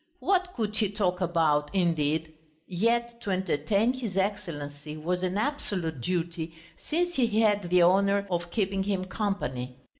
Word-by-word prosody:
What 370 -1 +1
could 215 -3 -2
he 215 -3 +2
talk 190 -3 0
about, 160 -4 +2
indeed? 160 -3 +1 0.3
Yet 235 +5 0
to 205 - -5
entertain 190 - +1
his 230 -7 -4
Excellency 150 -7 -3
was 180 +4 -1
an 185 +1 -1
absolute 190 - -2
duty 165 +1 -2 0.2
since 350 +3 -1
he 230 -7 +2
had 205 -4 +2
the 180 0 +5
honour 200 +3 +4
of 175 0 -1
keeping 195 0 0
him 190 -1 -1
company. 130 - -3
185 Hz, 145 wpm, -28 LUFS, 165-210 Hz, 0.3 s, the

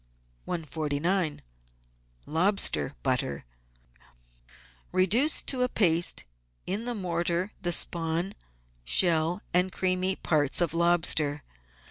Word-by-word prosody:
149— 160 +1 -2 0.8
LOBSTER 165 - 0
BUTTER 70 -2 -1 1.5
Reduce 210 - +3
to 260 -2 0
a 250 - +2
paste 170 -6 +2 0.4
in 205 +5 -2
the 245 -1 -3
mortar 175 0 -2
the 175 -2 -1
spawn, 170 +3 0 0.5
shell, 165 - +3
and 180 +1 +2
creamy 185 +1 0
parts 145 -7 0
of 170 -3 0
lobster. 165 -4 +1
175 Hz, 90 wpm, -27 LUFS, 160-190 Hz, 1.5 s, Reduce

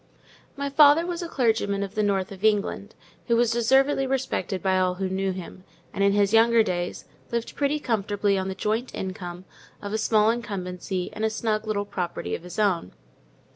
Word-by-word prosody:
My 280 0 -3
father 300 +3 +6
was 350 0 -3
a 345 - -4
clergyman 220 -7 +1
of 195 0 -6
the 215 - 0
north 195 -2 0
of 195 0 -10
England, 210 -1 0 0.3
who 235 - +3
was 235 -1 +3
deservedly 265 +4 +3
respected 260 -7 -2
by 190 -1 +2
all 185 -1 +1
who 190 +1 -2
knew 190 +1 -1
him; 185 0 -8 0.3
and, 200 - 0
in 200 0 +4
his 200 0 +2
younger 230 0 +5
days, 180 -3 -3 0.3
lived 235 -1 -3
pretty 290 +1 0
comfortably 205 -5 0
on 190 0 -1
the 190 - -4
joint 220 +5 -2
income 185 -2 -6 0.3
of 205 0 -6
a 220 - 0
small 215 0 +3
incumbency 185 -5 -4
and 215 - -5
a 220 - +3
snug 220 0 -2
little 205 -1 -1
property 180 -3 -4
of - - -3
his 180 0 -10
own. 190 - +1
205 Hz, 190 wpm, -25 LUFS, 190-235 Hz, 0.3 s, father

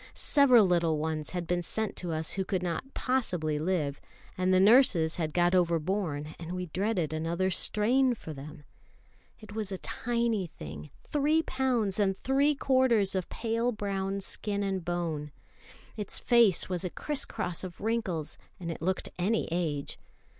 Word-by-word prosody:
Several 255 -7 +5
little 170 -3 +2
ones 155 0 -2
had 180 -1 -3
been 175 +1 0
sent 220 +5 -2
to 175 -2 -3
us 160 0 -2
who 195 - -1
could 185 -1 -2
not 180 +10 -4
possibly 180 - 0
live; 155 -4 -1 0.3
and 185 0 +1
the 185 - +5
nurses 195 -7 +5
had 160 -3 -1
got 175 +2 +2
overborne, 170 -3 0
and 170 +1 -6
we 180 0 -3
dreaded 180 -2 -1
another 170 +4 0
strain 245 +7 +2
for 160 -7 -8
them. 145 +1 -10 0.8
It 215 -2 -11
was 215 -2 -3
a 190 - -3
tiny 235 -3 -1
thing, 75 - -9
three 300 +2 +2
pounds 245 -9 0
and 195 -2 +2
three 280 +5 +2
quarters 255 -7 +3
of 185 -2 -2
pale 230 +1 -1
brown 195 -2 -2
skin 205 +1 -3
and 190 -2 -2
bone. 165 -4 -3 0.6
Its 210 -2 -2
face 235 -7 +4
was 180 -1 -2
a 180 - -1
criss 295 - -2
cross 180 -6 -4
of 185 -2 -7
wrinkles, 205 -8 -2 0.2
and 170 -2 -4
it - - -7
looked 185 +3 -1
any 215 +5 +1
age. 155 -5 -2
185 Hz, 160 wpm, -29 LUFS, 165-225 Hz, 0.8 s, Several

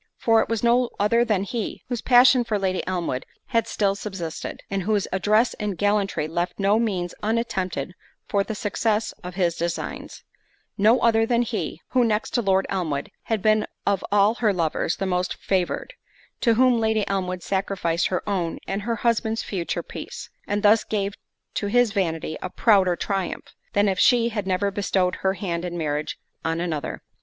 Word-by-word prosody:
For 225 -1 +4
it - - -3
was 230 -1 -1
no 240 +1 +3
other 230 +3 +3
than 210 -5 +1
he, 220 +2 -4
whose 245 -2 -3
passion 250 0 +6
for 220 -3 -1
Lady 190 -2 0
Elmwood 175 -8 -2 0.3
had 230 -2 +1
still 200 -2 +1
subsisted, 190 -5 -6
and 195 -1 -2
whose 205 +1 0
address 210 +5 +2
in 210 -3 -3
gallantry 205 -5 +1
left 175 +2 -2
no 200 +2 +3
means 185 -6 -1
unattempted 200 - -1 0.3
for 200 -1 +1
the 220 - -5
success 210 +2 0
of 180 0 -7
his 175 -3 +1
designs;—no 200 +6 -2
other 225 -1 +3
than 240 0 +2
he, - - -4
(who, 255 -2 +3
next 220 -2 0
to 240 - +1
Lord 195 -2 +2
Elmwood, 160 -8 -2
had 220 -4 -1
been 215 0 +3 0.2
of 200 -2 +1
all 205 +1 +4
her 215 -3 +4
lovers, 170 -2 0
the 195 - -3
most 180 -1 -1
favoured,) 185 -3 -1 0.5
to 230 -2 +3
whom 250 0 +4
Lady 220 -2 +1
Elmwood 185 -2 -2
sacrificed 190 -3 0
her 185 - -3
own 180 -5 -1
and 195 +1 -2
her 230 +3 -1
husband's 225 -1 +1
future 180 -4 -3
peace, - - -8 0.2
and 205 +1 -1
thus 215 +1 +5
gave 200 -2 -2 0.4
to 205 - -2
his 245 +1 +3
vanity 165 -6 -1
a 185 - -4
prouder 190 -4 +3
triumph, 195 +1 -3 0.2
than 205 0 +3
if 190 -2 0
she 240 -2 +5
had 205 -4 -3
never 195 +2 +1
bestowed 190 -2 0
her 190 0 +1
hand 175 -3 -3
in 175 -1 -4
marriage 150 -2 -2 0.3
on 165 +1 -1
another. 165 -4 -3
200 Hz, 175 wpm, -24 LUFS, 180-220 Hz, 0.5 s, passion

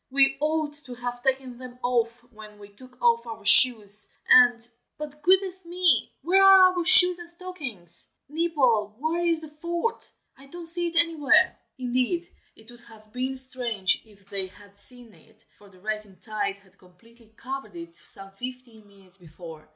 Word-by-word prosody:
We 275 0 +3
ought 305 0 -2
to 250 - -9
have 245 0 -6
taken 260 -2 -2
them 250 -1 -11
off 240 -1 -2
when 215 -1 -14
we 205 0 -15
took 250 +4 -19
off 235 0 +2
our 225 -2 -10
shoes 210 -3 +6 0.2
and 245 -1 +5 0.4
but, 300 0 -9
goodness 375 +2 +1
me! 345 -6 +2
where 370 +5 +3
are 380 -1 +7
our 355 - -1
shoes 360 0 +6
and 345 -1 -11
stockings? 310 - -8 0.2
Nibble, 270 -10 0
where 320 +5 -2
is 335 -2 0
the 315 - -10
fort? 340 +9 -1 0.2
I 275 +1 -17
don't 345 +4 -8
see 345 +1 +4
it 335 - -7
anywhere." 330 -4 +3 0.2
Indeed, 255 +7 -2 0.3
it 220 +2 -15
would 240 - -9
have 220 -2 -18
been 260 +1 -2
strange 245 -7 0
if 200 -3 -23
they 195 -2 0
had 200 +1 -18
seen 245 0 -6
it, 220 +1 -25
for 205 - -19
the 185 -1 -21
rising 215 -1 -6
tide 205 -3 -4
had 195 -1 -26
completely 220 +5 -23
covered 270 +6 -8
it 335 0 -11
some 195 0 -3
fifteen 240 0 -11
minutes 195 -2 -22
before. 160 -2 -14
250 Hz, 170 wpm, -24 LUFS, 215-320 Hz, 0.4 s, are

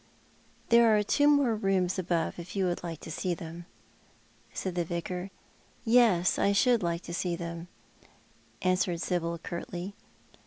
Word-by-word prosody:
"There 235 -2 +6
are 210 - +2
two 290 +7 +3
more 285 -6 +4
rooms 195 -3 0
above, 170 -2 -1
if 170 +3 -8
you 195 -1 +1
would 175 -1 -1
like 165 -3 -6
to - - -8
sec 175 +1 -2
them? 170 +1 -9 0.4
" - - -33 0.3
said 185 - -4
the 175 0 0
Vicar. 180 +2 -4 0.3
" - - -33 0.2
Yes, 225 -7 +4
I 200 - +3
should 240 +3 +3
like 170 -1 -1
to 170 - -7
see 175 0 -1
them," 170 0 -6 1.0
answered 185 -1 +1
Sibyl 170 -1 -1
curtly. 175 +3 -6
180 Hz, 160 wpm, -29 LUFS, 170-200 Hz, 1.0 s, There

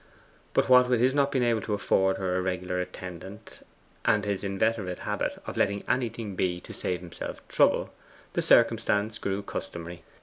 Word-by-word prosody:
But - - +3
what 125 -1 +6
with 125 -2 +3
his 130 +2 +3
not 140 -1 +2
being 130 -3 +1
able 115 -2 +2
to 105 - -1
afford 95 -1 +2
her 95 -1 -1
a 90 - +1
regular 90 0 -2
attendant, 95 +4 -9 0.4
and 105 -3 +2
his 100 -1 -2
inveterate 100 -1 0
habit - - -2
of - - -6
letting 100 0 +1
anything 115 -5 -1
be 90 -1 0
to - - -10
save 90 -1 -3
himself 90 -2 -8
trouble, - - +2 0.4
the - - +1
circumstance 105 +1 +3
grew 100 +1 -2
customary. 85 -2 -6
100 Hz, 170 wpm, -28 LUFS, 90-115 Hz, 0.4 s, what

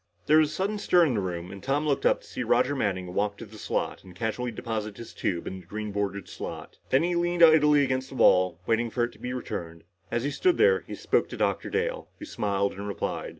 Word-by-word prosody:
There 155 +1 +6
was 155 -1 +3
a - - -7
sudden 205 +2 -1
stir 180 -4 +4
in 140 - +1
the 110 - 0
room 90 -2 -4
and 100 0 -9
Tom 140 +6 0
looked 140 -2 +2
up - - +2
to - - -17
see - - -5
Roger 140 +3 +2
Manning 95 -7 -2
walk 100 +1 0
to 115 - -8
the 110 0 -13
slot - - -2
and 90 -2 -14
casually 115 +5 -2
deposit 110 -2 -4
his 115 - -9
tube 85 -3 -2
in 95 - -5
the 90 - -15
green 105 +2 -5
bordered 100 -1 -3
slot. - - -8
Then 135 +4 +3
he 175 +1 0
leaned 175 0 +2
idly 150 -3 +6
against 130 0 -1
the - - -9
wall 90 -7 +4
waiting 115 +1 +1
for 120 +1 -1
it 120 - -1
to - - -19
be 125 - -4
returned. 85 -9 -5 0.3
As 120 - -1
he 145 - -1
stood 355 - +2
there, 460 +1 +5
he - - -6
spoke - - 0
to - - -7
Dr. - - 0
Dale, - - -2
who 310 - -8
smiled 100 - -1
and 100 +1 -6
replied. 100 - -3
115 Hz, 250 wpm, -27 LUFS, 100-150 Hz, 0.3 s, There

